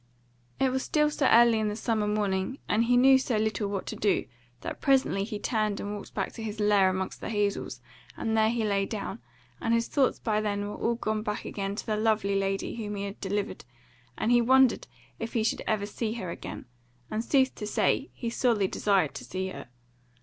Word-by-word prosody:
It 265 -1 +3
was 260 +1 0
still 300 +1 +2
so 285 -2 +1
early 235 -1 +6
in 215 - 0
the 210 - -2
summer 220 -1 0
morning, 210 +3 -1
and 220 +3 +2
he 245 +1 +4
knew 265 +1 +7
so 250 -4 -1
little 215 -1 0
what 200 -1 -3
to - - -5
do, 205 - +1 0.4
that - - -6
presently 265 -8 +3
he 210 +1 -4
turned 215 -2 -1
and 205 0 -4
walked 205 - -10
back - - -1
to 230 - -9
his 215 -1 -5
lair 205 -2 +4
amongst 185 0 -3
the - - -4
hazels, 205 -2 -1 0.4
and 225 0 -1
there 220 0 +4
he 230 -1 0
lay 200 -2 +1
down, 205 - -5 0.4
and 230 0 +2
his 230 0 +1
thoughts 275 -3 +2
by 215 -2 0
then 205 -1 -1
were 205 - -5
all 235 - 0
gone 215 -2 -2
back 210 -1 -4
again 195 0 -3
to - - -5
the 215 -2 -1
lovely 215 -2 +1
lady 195 0 -1
whom 210 -2 -4
he 200 - -3
had 200 0 -6
delivered, 200 +1 -2 0.5
and 225 - 0
he 240 0 +6
wondered 260 +1 +4 0.3
if 225 0 -5
he 225 - +1
should 220 - 0
ever 210 -2 +1
see 215 +1 -3
her 190 -7 -5
again, - - -7 0.5
and, 215 +1 -1
sooth 265 0 +3
to 210 - -6
say, 270 +6 +1
he 235 - -5
sorely 230 -5 +2
desired 190 -6 +1
to - - -7
see 190 +1 -4
her. - - -8
215 Hz, 215 wpm, -28 LUFS, 205-235 Hz, 0.5 s, knew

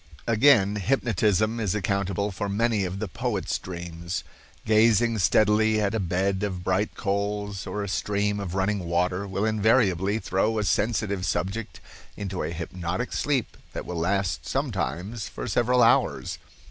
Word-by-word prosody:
Again, 110 -4 +4
hypnotism 110 -1 +1
is 105 -3 0
accountable 100 0 -1
for 100 +2 -3
many 105 0 +1
of 90 +1 -4
the 110 +1 -3
poet's 85 - -2
dreams. 85 0 -5 0.4
Gazing 110 +1 +4
steadily 110 +3 +3
at 105 -1 0
a 110 - 0
bed 95 +1 0
of 95 -3 -3
bright 95 +3 0
coals 100 0 -2
or 100 +2 -3
a - - -4
stream 105 +1 0
of 95 -3 -4
running 100 +2 +1
water 90 +3 0
will 95 +2 -1
invariably 105 -3 +2
throw 110 +1 0
a 105 - +1
sensitive 105 -1 0
subject 100 +4 -2 0.4
into 95 -2 -4
a 75 - -2
hypnotic 85 +5 -4
sleep 140 -5 0 0.2
that - - -5
will 90 -2 -4
last 95 +1 -1
sometimes 95 - -2
for - - -6
several 120 +3 +3
hours. - - +2
100 Hz, 145 wpm, -26 LUFS, 95-110 Hz, 0.4 s, Again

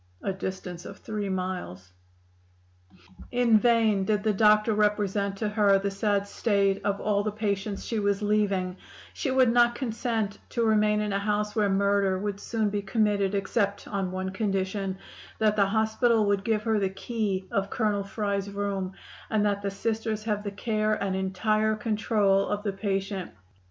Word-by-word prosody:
(A 195 - -1
distance 185 -2 -6
of - - -9
three 210 -2 -4
miles.) 180 - -4 1.4
"In 240 -3 +4
vain 225 -4 +3
did 210 0 0
the 215 -1 +2
doctor 215 +2 +4
represent 205 -1 +1
to 215 +1 -1
her 205 -2 +4
the 200 +1 -2
sad 200 0 0
state 200 -2 +1
of 200 0 0
all 205 -1 +1
the 215 +1 -2
patients 200 -1 -2
she 225 - -1
was 200 0 0
leaving; 200 -3 +1 0.4
she 285 - -2
would 260 -2 +4
not 240 0 +4
consent 225 -4 -2
to 235 -1 0
remain 210 -1 +3
in 210 -1 -2
a 195 - +1
house 210 +1 -1
where 210 -2 +2
murder 200 -1 +2
would 200 0 -3
soon 215 -1 -1
be 205 0 -1
committed; 205 -1 +1
except 200 0 -1
on 195 -2 -2
one 185 0 -3
condition: 195 -1 -2 0.4
that 215 -1 +2
the 200 -2 +4
doctor 220 +3 +2
would 200 -2 +1
give 215 -1 0
her 220 -1 +1
the 195 -1 +1
key 195 -1 -3
of 195 0 0
Colonel 210 -3 0
Fry's 200 -1 -2
room, 200 -2 -3 0.4
and 215 -1 +1
that 200 -1 0
the 200 - -1
Sisters 220 +1 -2
have 210 -2 -1
the 205 - -3
care 215 +1 0
and 195 -2 -2
entire 215 +3 +1
control 210 -2 +1
of 205 0 -2
the 200 -2 -1
patient. 195 -1 -2
205 Hz, 170 wpm, -27 LUFS, 195-215 Hz, 1.4 s, In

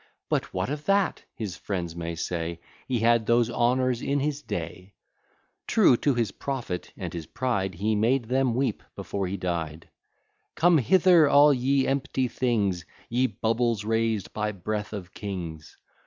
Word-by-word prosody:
But - - -1
what 95 +8 -2
of 150 0 -5
that? 200 -1 +2
his 105 -7 -5
friends 85 +2 -4
may 85 0 -4
say, 85 0 -3 0.3
He 125 -4 0
had 115 -1 +3
those 120 0 +3
honours 125 +1 +1
in 140 +1 0
his 145 +1 -1
day. 90 - -6 0.7
True 200 - +5
to 140 0 +1
his 115 -4 0
profit 125 -10 -4
and - - -5
his 85 -3 -6
pride, 100 -7 -1
He 105 +5 0
made 120 +5 +2
them 130 0 +1
weep 130 -4 0
before 100 -2 -3
he 95 +2 -3
died. 85 -3 -4 0.7
Come 170 -1 +5
hither, 170 - +5
all 145 +1 +7
ye 135 +1 +2
empty 135 -1 0
things! 105 -9 0 0.3
Ye 125 +2 +2
bubbles 115 -2 0
raised 110 -3 0
by 105 0 -2
breath 105 +3 -4
of 95 -4 -7
kings! 85 -6 -6
115 Hz, 155 wpm, -26 LUFS, 95-130 Hz, 0.7 s, all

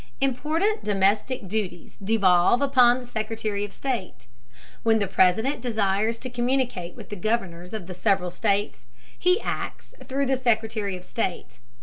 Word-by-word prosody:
Important 310 - 0
domestic 205 +3 +1
duties 185 -4 -4
devolve 195 0 +4
upon 255 -3 +5
the 255 - -8
Secretary 220 -3 -3
of 205 - -5
State. 245 -9 -4 0.6
When 225 -1 +3
the 205 - +1
President 195 +8 +2
desires 220 -1 0
to 255 - -5
communicate 245 -8 -1
with - - -11
the 210 - -5
Governors 180 -4 -2
of 215 -5 -5
the 180 - -7
several 185 -1 +1
states, 205 +1 -1 0.3
he 360 +3 +3
acts - - -5
through 275 +1 0
the 265 0 +1
Secretary 220 -5 0
of 180 - -13
State. 185 - -3
220 Hz, 145 wpm, -25 LUFS, 195-250 Hz, 0.6 s, upon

